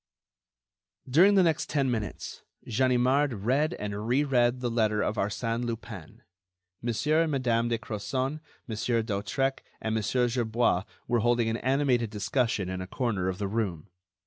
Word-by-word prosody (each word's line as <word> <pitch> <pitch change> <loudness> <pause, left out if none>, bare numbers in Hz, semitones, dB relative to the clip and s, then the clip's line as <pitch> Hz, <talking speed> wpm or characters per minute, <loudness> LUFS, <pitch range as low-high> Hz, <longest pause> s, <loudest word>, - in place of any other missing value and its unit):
During 175 +10 +5
the 190 - +6
next 165 0 +1
ten 135 -4 +1
minutes, 110 -6 -4 0.3
Ganimard 125 -1 +2
read 140 +6 +2
and 105 +1 -4
re 130 +5 +3
read 125 -3 +2
the 120 -1 -2
letter 110 -2 +1
of 110 - -1
Arsène 115 +4 -1
Lupin. 115 -7 -7 0.6
Monsieur 145 +7 +1
and 165 -2 +1
Madame 120 -4 +1
de 115 - +1
Crozon, 130 +6 -3 0.3
Monsieur 115 0 -1
d'Hautrec 110 +6 -1 0.2
and 110 - -2
Monsieur 120 +3 +1
Gerbois 115 -5 +1 0.2
were 120 -1 +2
holding 120 0 +2
an 115 - -1
animated 130 -3 +1
discussion 110 -1 0
in 95 0 -4
a 95 - -6
corner 105 -6 -1
of 90 - -3
the 100 - -2
room. 100 -5 -2
120 Hz, 150 wpm, -28 LUFS, 110-130 Hz, 0.6 s, the